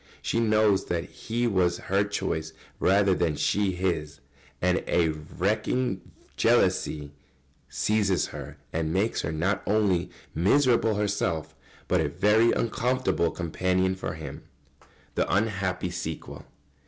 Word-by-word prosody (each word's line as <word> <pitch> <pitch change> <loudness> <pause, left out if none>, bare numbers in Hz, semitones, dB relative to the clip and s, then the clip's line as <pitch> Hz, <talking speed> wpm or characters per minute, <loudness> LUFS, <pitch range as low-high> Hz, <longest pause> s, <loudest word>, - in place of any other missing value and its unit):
She 115 - 0
knows 110 -3 +3
that 85 -1 -1
he 115 +6 -3
was 90 -6 +2
her 100 +1 +1
choice, 80 -6 -3 0.3
rather 100 0 +4
than 85 -4 0
she 100 +4 +1
his, 80 -5 -2 0.4
and 90 +2 +1
a 85 -2 +3
racking 95 +8 -1 0.3
jealousy 75 -2 +2 0.6
seizes 95 +7 +1
her - - -8 0.2
and 80 -1 -1
makes 100 +6 +1
her 80 - -3
not 90 +5 0
only 100 -4 +2 0.2
miserable 115 - +3
herself, 100 -6 -1 0.3
but 90 -2 +2
a 75 - 0
very 105 +8 +4
uncomfortable 125 -6 +1
companion 90 +2 0
for 95 - -5
him. 75 -3 -8 0.3
[Sidenote: - - -28 0.4
The - - +2
unhappy 95 -4 -1
sequel. 85 -2 -6
95 Hz, 125 wpm, -27 LUFS, 85-105 Hz, 0.6 s, rather